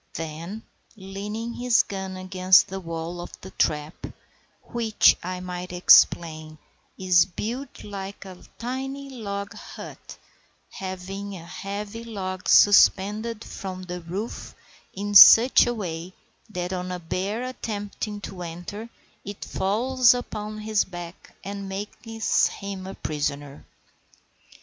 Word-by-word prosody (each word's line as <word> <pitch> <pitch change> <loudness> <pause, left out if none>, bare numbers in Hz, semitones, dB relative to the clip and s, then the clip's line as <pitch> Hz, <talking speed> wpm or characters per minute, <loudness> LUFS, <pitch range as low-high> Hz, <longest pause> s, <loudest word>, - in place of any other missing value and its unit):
Then, 165 +7 -6 0.3
leaning 210 +4 -6
his 245 -1 +3
gun 190 -1 -6
against 185 0 +4
the 195 +1 -4
wall 165 0 -5
of 175 - -10
the 190 - -10
trap 150 +1 -1 0.6
(which, 230 -3 +3
I 180 +1 -4
might 180 0 -6
explain, 155 -3 +4 0.4
is 185 -2 +4
built 240 +8 -6
like 200 -1 -7
a 185 -2 -11
tiny 270 +3 -5
log 200 -5 -5
hut, - - -10 0.5
having 195 +1 -6
a 170 -2 -10
heavy 200 +5 -6
log 185 -5 -5
suspended 210 +2 +5
from 185 -1 -7
the 180 -1 -6
roof 190 +7 -6 0.4
in 205 +1 -4
such 230 +5 +9
a 240 - 0
way 175 -3 -5 0.4
that 180 -2 -4
on 180 0 -3
a 180 - -3
bear 190 +7 -3
attempting 210 -4 -5
to 190 -2 -8
enter 175 +7 -7 0.3
it 200 0 -7
falls 245 +5 +3
upon 215 -3 -5
his 215 -1 +1
back 175 -1 -10
and 200 0 -6
makes 220 +3 0
him 195 -2 -7
a 190 - -7
prisoner). 145 -2 -4
195 Hz, 120 wpm, -25 LUFS, 180-215 Hz, 0.6 s, such